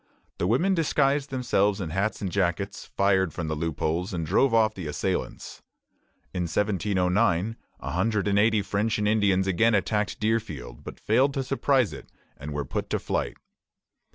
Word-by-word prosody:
The 85 - +1
women 165 - +2
disguised 145 -4 +1
themselves 105 -6 +1
in 85 -5 -4
hats 100 +4 -1
and 95 - -2
jackets, 100 +1 -1
fired 95 -4 +3
from 85 -3 -4
the 80 - -1
loopholes, 80 +3 -2
and 85 -2 -2
drove 105 - +3
off 110 -1 +3
the 90 -6 -6
assailants. 75 - -3 0.7
In 90 -2 -1
1709 95 0 +1 0.2
a - - -5
hundred 105 +3 0
and 100 0 +3
eighty 110 -1 +3
French 105 +3 0
and 105 -1 0
Indians 100 -3 +3
again 105 +4 +3
attacked 105 +1 0
Deerfield, 105 - -2
but - - -9
failed 130 +6 +2
to 135 - 0
surprise 135 -3 +1
it, - - -11 0.2
and 75 +2 -8
were 75 -1 -3
put - - -4
to - - +1
flight. - - -2
100 Hz, 165 wpm, -26 LUFS, 90-115 Hz, 0.7 s, fired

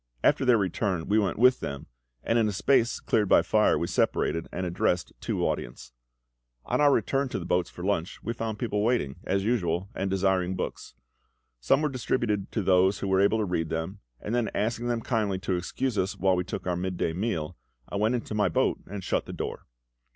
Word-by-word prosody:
After - - +3
their 125 -2 +5
return 95 -3 -1
we 105 +2 +3
went 100 -5 0
with 125 +3 +5
them, 70 -1 -5 0.4
and 115 +1 +2
in 110 - +3
a - - 0
space 115 +5 +2
cleared 105 -3 +1
by - - +6
fire - - +3
we - - -1
separated, 80 0 0
and 90 - -3
addressed 90 0 0
two - - -1
audiences. - - -4 0.7
On - - 0
our 145 -1 +6
return 135 0 +1
to - - -3
the 85 - -5
boats 90 0 +1
for 90 - -9
lunch, 95 -3 -1
we 115 - -2
found 115 -2 -4
people 105 -3 -1
waiting, 110 - 0
as 95 +1 0
usual, 95 -5 0
and 95 - -2
desiring 95 -1 +1
books. 90 - -5 0.6
Some 60 - +2
were - - +3
distributed 115 -6 -1
to 110 - 0
those 95 +1 +4
who 100 - -4
were 95 0 +3
able 100 +3 +3
to 110 - 0
read 80 -4 -1
them; 80 +5 -3 0.2
and 105 - -5
then 120 -2 +1
asking 115 +2 -1
them 120 -1 0
kindly 110 -5 0
to 95 0 -2
excuse 110 +6 -2
us 95 - -1
while 95 -1 +3
we 90 - 0
took - - -5
our 90 -1 0
midday 90 -2 -2
meal, 90 -5 -2 0.3
I - - -4
went 110 +4 +2
into 115 -2 -4
my 105 -3 +2
boat 80 - +1
and 100 0 -6
shut - - -1
the - - -6
door. - - -5
100 Hz, 210 wpm, -27 LUFS, 90-115 Hz, 0.7 s, by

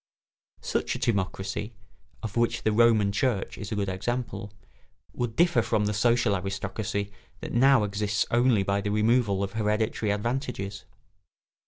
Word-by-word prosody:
Such - - -1
a - - -2
timocracy 100 +1 -2 0.5
(of 110 -3 -5
which 120 0 +1
the 110 - +2
Roman 110 -2 +4
Church 110 -1 -1
is 105 0 -6
a - - -1
good 100 -1 -1
example) 105 +1 -3 0.6
would 120 -2 -3
differ 170 -7 +4
from 110 -1 0
the 105 - 0
social 115 0 +2
aristocracy 100 +2 -3 0.3
that - - -6
now 130 -1 +5
exists 100 0 0
only 120 -3 +3
by 100 +1 0
the 105 - -2
removal 105 -1 +2
of 100 - -3
hereditary 110 0 0
advantages. 105 -3 -3
105 Hz, 145 wpm, -27 LUFS, 100-120 Hz, 0.6 s, now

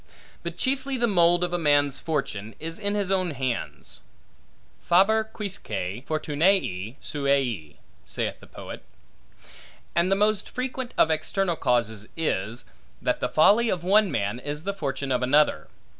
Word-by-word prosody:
But - - -6
chiefly, 270 0 -1
the 240 - +2
mould 175 -4 +4
of 175 0 -1
a 175 - 0
man's 145 -3 +3
fortune 115 -9 -3
is 165 +3 -6
in 205 0 -1
his 200 -2 0
own 185 -2 +2
hands. 130 -3 -4 0.8
Faber 195 +5 +4
quisque 210 -3 -6 0.4
fortunae 150 - +1
suae, 135 - -1 0.3
saith - - -3
the - - -15
poet. - - -9 1.1
And 170 +3 +2
the - - +5
most 210 0 +1
frequent 255 0 -4
of 160 - +4
external 175 +3 0
causes 115 -6 0
is, 115 -7 -2 0.3
that - - 0
the - - -1
folly 215 +9 +5
of 180 -4 -1
one 200 +2 +4
man, 105 -4 -1
is 145 +3 -5
the 200 +2 -2
fortune 140 -6 -3
of 125 -1 +1
another. 130 - +3
165 Hz, 145 wpm, -25 LUFS, 135-200 Hz, 1.1 s, the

